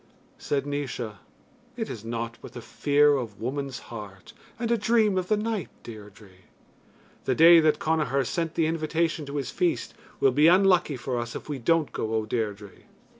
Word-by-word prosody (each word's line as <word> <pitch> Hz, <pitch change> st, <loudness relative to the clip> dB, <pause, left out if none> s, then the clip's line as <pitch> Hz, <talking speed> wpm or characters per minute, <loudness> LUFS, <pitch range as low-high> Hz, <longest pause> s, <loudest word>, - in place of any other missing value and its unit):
Said 140 Hz, -1 st, -1 dB
Naois: 130 Hz, -7 st, -4 dB, 0.6 s
It 225 Hz, -2 st, -3 dB
is 110 Hz, -, -7 dB
nought 115 Hz, 0 st, -5 dB
but -, -, -11 dB
the 120 Hz, -, -8 dB
fear 145 Hz, 0 st, +3 dB
of 115 Hz, -5 st, -6 dB
woman's 135 Hz, +1 st, -4 dB, 0.2 s
heart, 100 Hz, -4 st, -10 dB, 0.2 s
And 235 Hz, -1 st, -2 dB
a -, -, +4 dB
dream 215 Hz, -2 st, +2 dB
of 185 Hz, -1 st, -1 dB
the 215 Hz, -, +2 dB
night, 215 Hz, -2 st, -2 dB
Deirdre. 105 Hz, -2 st, -12 dB, 0.9 s
"The 130 Hz, -, +1 dB
day 165 Hz, +3 st, +8 dB
that 155 Hz, -2 st, +3 dB
Connachar 150 Hz, -4 st, 0 dB
sent 165 Hz, +4 st, -3 dB
the 165 Hz, -, +2 dB
invitation 160 Hz, -1 st, -1 dB
to 140 Hz, -, -6 dB
his 140 Hz, -, -3 dB
feast 175 Hz, -2 st, -1 dB, 0.3 s
will 135 Hz, -, +4 dB
be 150 Hz, +5 st, +4 dB
unlucky 180 Hz, -5 st, +4 dB
for 125 Hz, 0 st, -3 dB
us 120 Hz, 0 st, -5 dB
if -, -, -7 dB
we 145 Hz, -3 st, -4 dB
don't 160 Hz, +4 st, +1 dB
go, 110 Hz, 0 st, -3 dB
O 110 Hz, -1 st, 0 dB
Deirdre." 105 Hz, -3 st, -3 dB
145 Hz, 175 wpm, -26 LUFS, 115-165 Hz, 0.9 s, day